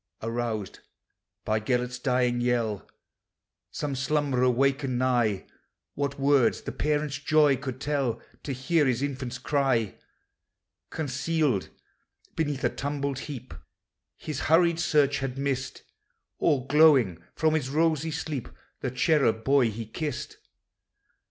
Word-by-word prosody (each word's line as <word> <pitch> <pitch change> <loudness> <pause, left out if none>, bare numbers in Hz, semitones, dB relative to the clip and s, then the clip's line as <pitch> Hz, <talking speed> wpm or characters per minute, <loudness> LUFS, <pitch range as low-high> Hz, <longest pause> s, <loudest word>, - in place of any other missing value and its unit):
Aroused 115 -3 -3 0.7
by 110 0 +1
Gelert's 125 +2 -1
dying 125 -2 +1
yell, 115 -4 -1 0.8
Some 145 -2 -3
slumberer 135 -2 +1
wakened 135 +1 +1
nigh: 120 -6 +1 0.5
What 140 -1 -3
words 140 -2 +3
the - - -4
parent's 150 -1 -1
joy 150 -1 +4
could 130 0 -6
tell 140 -5 -1 0.2
To 140 - -5
hear 140 +4 +1
his 130 +1 0
infant's 130 -3 -3
cry! 130 -6 0 0.9
Concealed 150 - -1 0.7
beneath 145 -4 -1
a - - +3
tumbled 140 -1 -3
heap 130 - -7 0.6
His 150 -3 -5
hurried 170 +1 +3
search 145 -4 +2
had 135 -1 -4
missed, 135 -1 -3 0.6
All 130 -3 +2
glowing 140 - +5
from 155 0 +2
his 150 -5 0
rosy 160 +1 +1
sleep, 150 -4 -4 0.3
The 130 - -2
cherub 130 -3 +2
boy 135 -2 +4
he 110 +1 -6
kissed. 145 +5 -5
135 Hz, 120 wpm, -27 LUFS, 125-145 Hz, 0.9 s, glowing